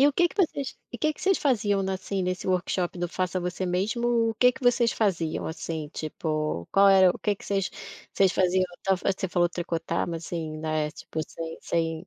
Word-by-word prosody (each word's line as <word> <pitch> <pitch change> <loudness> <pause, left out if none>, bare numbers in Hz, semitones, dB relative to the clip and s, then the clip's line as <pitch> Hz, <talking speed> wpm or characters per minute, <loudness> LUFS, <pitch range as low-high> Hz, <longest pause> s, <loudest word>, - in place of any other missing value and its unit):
E 280 - +7
o - - 0
que 345 +5 +3
que - - -15
vocês 280 -5 -1 0.2
e - - -4
que 310 -1 +1
que - - -15
vocês 385 -1 +4
faziam 205 -8 +2
na, 190 0 -1
assim, 190 0 -3
nesse 185 0 -2
workshop 180 -1 0
do 175 - -1
faça 185 +1 -1
você 180 +1 -3
mesmo, 230 +5 +1
o - - -5
que 250 +2 +5
que 260 - -13
vocês 245 -1 +3
faziam, 170 -7 0
assim, 160 -1 -4
tipo, 155 - -3
qual 195 0 +6
era 190 -2 +7
o - - -5
que 210 - 0
que - - -14
vocês 195 -2 0 0.6
faziam 185 0 +3 0.2
você 190 0 +1
falou 175 -1 +2
tricotar 170 -1 -2
mas 165 -1 -4
assim, 160 -3 -4
né, 155 -1 -1
tipo, 160 - -6
sem 165 0 -6
sem 165 +1 -2
185 Hz, 205 wpm, -27 LUFS, 165-205 Hz, 0.6 s, E